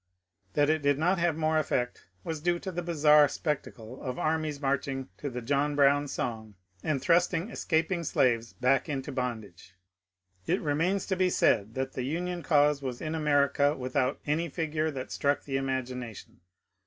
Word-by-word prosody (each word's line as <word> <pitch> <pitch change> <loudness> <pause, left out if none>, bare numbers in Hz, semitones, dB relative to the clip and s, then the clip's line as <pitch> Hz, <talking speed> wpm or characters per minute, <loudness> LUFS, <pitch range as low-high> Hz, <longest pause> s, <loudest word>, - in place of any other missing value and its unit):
That 145 +1 +3
it 155 -1 0
did 145 -1 +2
not 175 +4 +2
have 170 -2 +1
more 155 0 +2
effect 125 -5 -2 0.2
was 160 +3 -4
due 175 +1 +1
to 190 - -4
the 175 0 -3
bizarre 150 -3 +5
specta 150 +1 -3
cle 115 +3 -11
of 125 -2 -4
armies 155 -2 -1
marching 135 -2 -2
to 145 - -3
the 125 -1 -6
John 145 +3 +1
Brown 145 0 +4
song 110 -5 -4 0.3
and 150 -3 0
thrust 175 +6 +3
ing 175 +8 -3
escaping 170 -1 0
slaves 120 -6 +1
back 130 +4 +1
into 135 -2 -3
bondage. 110 - -5 0.7
It - - +2
remains 165 +6 0
to 190 - -1
be 185 0 +2
said 110 - +2
that 130 0 -3
the 130 - -3
Union 175 +6 -3
cause 145 -3 +3
was 130 -3 -4
in 155 -1 -4
America 145 -1 +2
without 130 +1 -1
any 160 +3 0
figure 155 0 -1
that 135 -4 -6
struck 140 0 0
the 135 -1 -2
imagination. 130 -4 -4
145 Hz, 175 wpm, -29 LUFS, 130-160 Hz, 0.7 s, bizarre